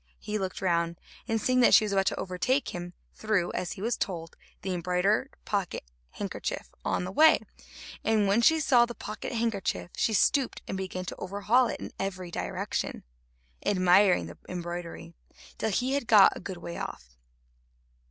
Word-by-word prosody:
He 210 0 -4
looked 190 0 -4
round, 170 -1 0 0.3
and 225 -2 0
seeing 255 +3 +2
that 245 - +7
she 215 - +6
was 210 - -3
about 195 -1 +2
to - - 0
overtake 225 +10 0
him, 175 0 -6 0.2
threw, 210 -5 0
as 180 -1 -3
he 190 - -8
was 235 +1 0
told, 165 -4 -4 0.3
the 190 0 -2
embroidered 180 +8 0
pocket 200 -4 -2 0.3
handkerchief - - -5
on - - 0
the 185 - -4
way, 315 +10 +6 0.6
and 215 -2 +2
when 200 +4 +3
she 320 +7 +5
saw 245 -5 +4
the 240 - -7
pocket 215 +1 -6
handkerchief 225 -6 -2
she 220 - +1
stooped 265 +6 +2
and - - -3
began 185 -1 -4
to - - -5
overhaul 205 +6 +2
it - - -4
in - - -7
every 185 -2 -4
direction, - - -3 0.6
admiring 185 0 +4
the - - -11
embroidery, 175 -1 -6 0.5
till 220 - 0
he 250 +6 0
had 280 -4 -1
got 210 -4 +7
a - - -6
good 190 -1 -6
way 170 0 -7
off. - - -7
195 Hz, 170 wpm, -28 LUFS, 180-225 Hz, 0.6 s, that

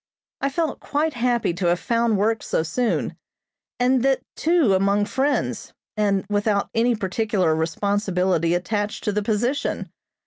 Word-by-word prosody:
I 275 - +1
felt 320 +1 -2
quite 305 +2 -1
happy 240 -6 0
to 175 +1 -1
have 175 0 +2
found 230 -1 +1
work 220 +3 +1
so - - -1
soon, 230 +9 -1 0.6
and 250 +1 +3
that 270 +1 +2
too 320 - +3
among 200 +2 +2
friends, 275 +6 -1 0.2
and 200 -3 +1
without 205 0 0
any 235 +1 +2
particular 195 -3 0
responsibility 180 0 0
attached 205 +4 -2
to 210 - 0
the 210 +1 0
position. 235 +6 -1
210 Hz, 140 wpm, -23 LUFS, 190-245 Hz, 0.6 s, and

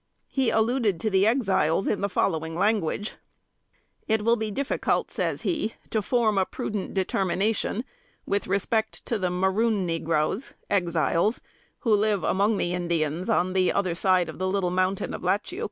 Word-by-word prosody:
He 265 -3 +1
alluded 220 -4 +1
to 215 - 0
the 195 +2 +4
Exiles 195 - +2
in 205 - 0
the 200 - 0
following 160 -4 -1
language: 205 +1 0 0.9
"It 220 -1 +1
will 230 0 +5
be 220 -2 -3
difficult 275 +7 -1
(says - - -2
he) 270 -10 -1 0.2
to 220 - +1
form 215 -2 +2
a 190 - +2
prudent 210 -2 -4
determination 195 +5 0 0.4
with 200 0 -1
respect 215 +3 -1
to 230 - -1
the 185 -2 0
'maroon 190 +3 +1
negroes,' 165 - -1 0.2
(Exiles), 175 +2 +1 0.4
who 230 -4 +2
live 205 -1 +1
among 205 +2 +2
the 175 - -1
Indians, 170 0 -1
on 185 -4 +2
the 185 -1 +3
other 185 -3 0
side 185 0 +2
of - - -8
the 185 - 0
little 185 -2 0
mountain 185 +1 0
of - - -5
Latchiouc. 205 - -1
195 Hz, 160 wpm, -26 LUFS, 180-220 Hz, 0.9 s, will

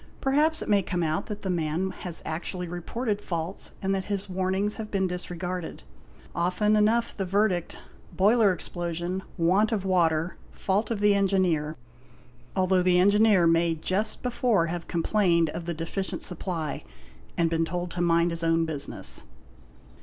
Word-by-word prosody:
Perhaps 300 +4 +2
it - - -9
may 205 -2 +4
come 180 -2 -2
out 155 0 -1
that 210 -1 -6
the 190 - -2
man 170 +2 -1
has 175 -3 -7
actually 175 +3 -4
reported 205 +5 -3
faults 170 +1 -4
and 195 0 +1
that 190 -1 -2
his 200 -1 -2
warnings 190 +2 -1
have 215 -1 -5
been 195 -2 0
disregarded. 180 -1 -4 0.5
Often 185 +5 +1
enough 220 +3 +2
the 195 - -2
verdict 190 -2 +1
is; - - -12 0.2
"' - - -26
Boiler 210 +1 +5
explosion, 175 +1 -3 0.2
want 190 +6 +3
of 205 -4 -1
water, 170 -2 +1
fault 200 +3 -1
of 225 -3 -2
the 205 0 +5
engineer', 185 -6 +1 0.8
although 185 -1 +3
the 180 0 +3
engineer 205 -1 +5
may 165 0 +3
just 190 +7 0
before 240 -7 +2
have 170 0 -4
complained 170 -2 +2
of 170 - -6
the 170 - -2
deficient 170 +4 -4
supply 170 -4 -3 0.5
and 165 -1 +2
been 165 0 +2
told 175 +1 -3
to 175 - -3
''mind 170 0 +3
his 165 0 -2
own 165 0 +2
business". 150 -3 -4
180 Hz, 160 wpm, -27 LUFS, 170-200 Hz, 0.8 s, Boiler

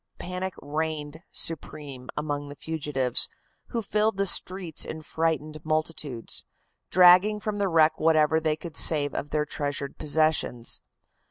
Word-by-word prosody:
Panic 185 +1 -5
reigned 155 +1 -4
supreme 145 -5 -4
among 145 -1 -3
the 145 - -9
fugitives, 145 -6 0 0.4
who 230 -2 -3
filled 210 +1 0
the 200 - +1
streets 185 -3 +2
in 160 0 -3
frightened 155 -1 -2
multitudes, 155 -6 -3 0.5
dragging 185 +4 +6
from 210 0 -4
the 200 - +1
wreck 160 -1 +3
whatever 160 0 +3
they 155 -1 0
could 165 -1 -10
save 145 -3 +6
of 145 - -4
their 150 0 -1
treasured 145 -2 -5
possessions. 155 -6 0
155 Hz, 135 wpm, -26 LUFS, 145-170 Hz, 0.5 s, dragging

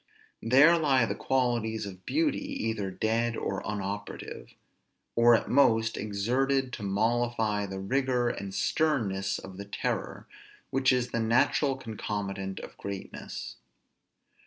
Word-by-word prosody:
There 145 +8 +6
lie 135 -6 +3
the - - -2
qualities 120 -4 0
of 95 -2 -10
beauty 315 -1 +1
either 115 - -3
dead 115 +4 0
or 95 - -2
unoperative; 100 0 -5 0.6
or 115 0 +7
at - - -1
most 115 -4 +3
exerted 125 +6 0
to - - -5
mollify 110 0 0
the 95 0 -5
rigor 125 +4 +1
and 100 -4 -3
sternness 100 -3 0
of 95 -1 -10
the 100 - -6
terror, 100 - -3 0.5
which 135 0 +3
is 125 -1 0
the 115 - -1
natural 125 +4 +2
concomitant 100 -5 -4
of - - -10
greatness. 100 -1 -6
115 Hz, 125 wpm, -29 LUFS, 100-130 Hz, 0.6 s, or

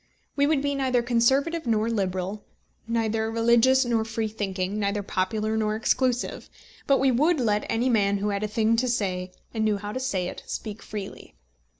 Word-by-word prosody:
We 285 0 +3
would 295 -2 +1
be 285 0 0
neither 260 -3 +1
conservative 265 +6 +2
nor 220 -1 +2
liberal, 195 -2 -2 0.4
neither 225 -1 0
religious 235 +3 +4
nor 230 -2 +1
free 225 0 -2
thinking, 200 -1 -3
neither 205 0 -1
popular 215 +4 -1
nor 215 -1 0
exclusive; 245 +2 0 0.4
but 275 - +5
we 270 -1 +3
would 300 +6 +2
let 210 -4 +1
any 230 +3 +1
man 200 -4 +2
who 205 +1 -1
had 200 -1 -1
a 215 - -1
thing 220 +2 +2
to 255 +2 +1
say, 185 -6 -1 0.2
and 220 -2 -1
knew 215 -1 +2
how 205 +1 -6
to 255 - -3
say 195 -9 -1
it, - - -7
speak 215 -1 -5
freely. 205 -2 -8
220 Hz, 185 wpm, -26 LUFS, 205-245 Hz, 0.4 s, but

